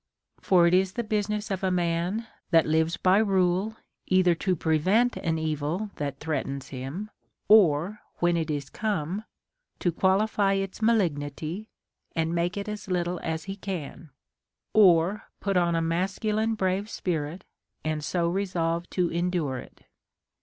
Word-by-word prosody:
For 180 Hz, -3 st, +4 dB
it 170 Hz, -, +3 dB
is 190 Hz, +1 st, +3 dB
the 235 Hz, -, -2 dB
business 210 Hz, 0 st, -1 dB
of 195 Hz, 0 st, -2 dB
a 190 Hz, -, +2 dB
man 175 Hz, +4 st, 0 dB, 0.2 s
that 165 Hz, -3 st, +5 dB
lives 160 Hz, +2 st, +1 dB
by 185 Hz, +2 st, +4 dB
rule, 195 Hz, 0 st, +2 dB, 0.3 s
either 185 Hz, -1 st, +4 dB
to 185 Hz, +2 st, 0 dB
pre 160 Hz, -1 st, +1 dB
vent 225 Hz, +10 st, +3 dB
an 165 Hz, -1 st, -1 dB
evil 160 Hz, +6 st, -2 dB
that 140 Hz, -2 st, -3 dB
threatens 140 Hz, -3 st, -3 dB
him, 140 Hz, +11 st, -6 dB, 0.4 s
or, 195 Hz, -1 st, +5 dB, 0.2 s
when 175 Hz, 0 st, +2 dB
it 165 Hz, -1 st, -1 dB
is 145 Hz, -3 st, -3 dB
come, 205 Hz, -1 st, -2 dB, 0.5 s
to 175 Hz, -, 0 dB
qualify 195 Hz, +3 st, +2 dB
its 195 Hz, +1 st, -3 dB
malignity 175 Hz, -2 st, 0 dB, 0.5 s
and 165 Hz, 0 st, 0 dB
make 170 Hz, +2 st, 0 dB
it 200 Hz, -, -4 dB
as 210 Hz, -1 st, -6 dB
little 180 Hz, -1 st, -1 dB
as 160 Hz, -1 st, -3 dB
he 195 Hz, 0 st, -5 dB
can, 175 Hz, -5 st, -6 dB, 0.6 s
or 190 Hz, -1 st, +5 dB
put 200 Hz, -1 st, -1 dB
on 170 Hz, -1 st, +3 dB
a 165 Hz, -, +1 dB
masculine 210 Hz, +6 st, 0 dB
brave 195 Hz, +1 st, -1 dB
spirit 170 Hz, -2 st, -3 dB, 0.4 s
and 155 Hz, -1 st, -1 dB
so 170 Hz, +2 st, 0 dB
resolve 170 Hz, -2 st, -1 dB
to 180 Hz, -2 st, 0 dB
endure 170 Hz, -6 st, -1 dB
it. -, -, -13 dB
180 Hz, 150 wpm, -27 LUFS, 160-200 Hz, 0.6 s, that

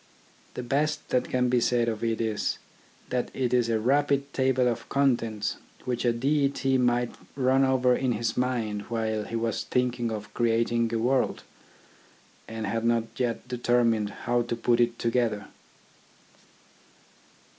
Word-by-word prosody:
The 125 Hz, -, -4 dB
best 150 Hz, +5 st, -1 dB
that 125 Hz, -, 0 dB
can 125 Hz, -1 st, +1 dB
be 125 Hz, -1 st, +2 dB
said 120 Hz, 0 st, +2 dB
of 110 Hz, -1 st, -2 dB
it 115 Hz, -1 st, 0 dB
is, 110 Hz, -2 st, -1 dB, 0.5 s
that 125 Hz, -1 st, -1 dB
it 125 Hz, -2 st, -1 dB
is 120 Hz, -2 st, +3 dB
a 115 Hz, -1 st, +1 dB
rapid 140 Hz, +3 st, +1 dB
table 130 Hz, -1 st, +2 dB
of 120 Hz, -, -3 dB
contents 115 Hz, -7 st, 0 dB, 0.3 s
which 125 Hz, -1 st, -2 dB
a 120 Hz, -, +4 dB
deity 135 Hz, +1 st, +1 dB
might 120 Hz, -1 st, +1 dB, 0.2 s
run 135 Hz, 0 st, +3 dB
over 130 Hz, -2 st, +3 dB
in 130 Hz, -1 st, 0 dB
his 110 Hz, +1 st, -2 dB
mind 120 Hz, -5 st, -1 dB
while 110 Hz, -2 st, -1 dB
he -, -, -6 dB
was 115 Hz, -1 st, -1 dB
thinking 125 Hz, 0 st, 0 dB
of 105 Hz, -1 st, -6 dB
creating 115 Hz, 0 st, +1 dB
a 115 Hz, -, 0 dB
world, 125 Hz, +3 st, +1 dB, 1.0 s
and 110 Hz, -1 st, -5 dB
had 115 Hz, +3 st, -2 dB
not 115 Hz, -1 st, +2 dB, 0.2 s
yet 120 Hz, -1 st, -1 dB
determined 120 Hz, -3 st, +1 dB, 0.2 s
how 120 Hz, 0 st, +2 dB
to 120 Hz, 0 st, -2 dB
put 120 Hz, +1 st, +1 dB
it 120 Hz, -1 st, +2 dB
together. 115 Hz, -3 st, 0 dB
120 Hz, 150 wpm, -27 LUFS, 115-125 Hz, 1.0 s, a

